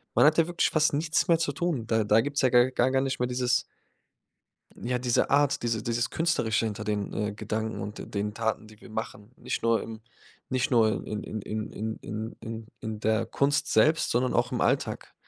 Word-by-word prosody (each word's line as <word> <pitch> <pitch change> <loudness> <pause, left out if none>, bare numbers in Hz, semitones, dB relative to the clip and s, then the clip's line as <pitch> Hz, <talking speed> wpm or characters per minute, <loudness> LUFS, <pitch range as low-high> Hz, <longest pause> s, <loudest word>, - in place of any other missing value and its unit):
Man - - +6
hat 155 +2 +5
ja 165 - +4
wirklich 175 0 +1
fast 155 -1 +3
nichts 155 +2 +1
mehr 165 -1 +5
zu 165 -3 0
tun. 145 -6 -1
Da 110 -1 +2
da 105 +2 +4
gibt's 145 +4 -1
ja 130 - +4
gar 125 +1 +5
gar 130 +1 +2
nicht 135 -1 -2
mehr 125 - +1
dieses 125 0 +1 1.2
ja, 125 +1 -1
diese 125 -1 +1
Art, 140 -2 +3
diese 115 -2 -1
dieses 120 +1 0
Künstlerische 120 -10 +1
hinter 110 -1 -3
den, 105 -1 -2
äh, 105 0 -2
Gedanken 110 +1 -3
und 105 +2 -6
de - - -7
den 105 0 -3
Taten, 110 -1 -2
die 110 0 -17
wir - - -13
machen. 110 -1 -6
Nicht - - -4
nur 115 -1 +2
im 110 -1 -8 0.5
nicht 130 -1 0
nur 110 -4 +2
in 105 -1 -4
in 110 - -5
in 110 +1 -4
in 110 +1 -4
in 110 +2 -6
in 115 0 -7
in 110 -1 -5
der 110 +1 +1
Kunst 145 +4 +1
selbst, 155 +1 +3
sondern 125 +1 +1
auch - - +2
im - - -1
Alltag. - - -1
115 Hz, 210 wpm, -27 LUFS, 110-130 Hz, 1.2 s, Man